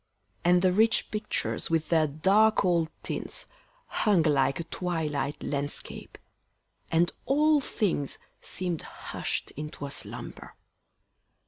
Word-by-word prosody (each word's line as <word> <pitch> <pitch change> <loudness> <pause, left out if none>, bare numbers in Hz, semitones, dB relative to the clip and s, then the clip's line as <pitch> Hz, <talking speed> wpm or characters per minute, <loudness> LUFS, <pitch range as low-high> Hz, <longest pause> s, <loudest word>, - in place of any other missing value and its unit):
And 180 +1 +4
the 185 -1 +4
rich 220 +3 +3
pictures 215 0 -2
with 165 -1 0
their 160 -2 +4
dark 195 +9 +4
old 170 -3 +2
tints - - -3 0.4
Hung 200 -6 +2
like 140 -2 +2
a - - -2
twilight 155 -5 -2
landscape, 145 0 -4 0.7
and 170 +1 +3 0.2
all 300 +2 +4
things 180 - -1 0.2
Seem'd 175 -3 -3
hush'd - - -5
into 150 -1 -6
a 140 - -6
slumber. - - -6
170 Hz, 115 wpm, -28 LUFS, 150-195 Hz, 0.7 s, And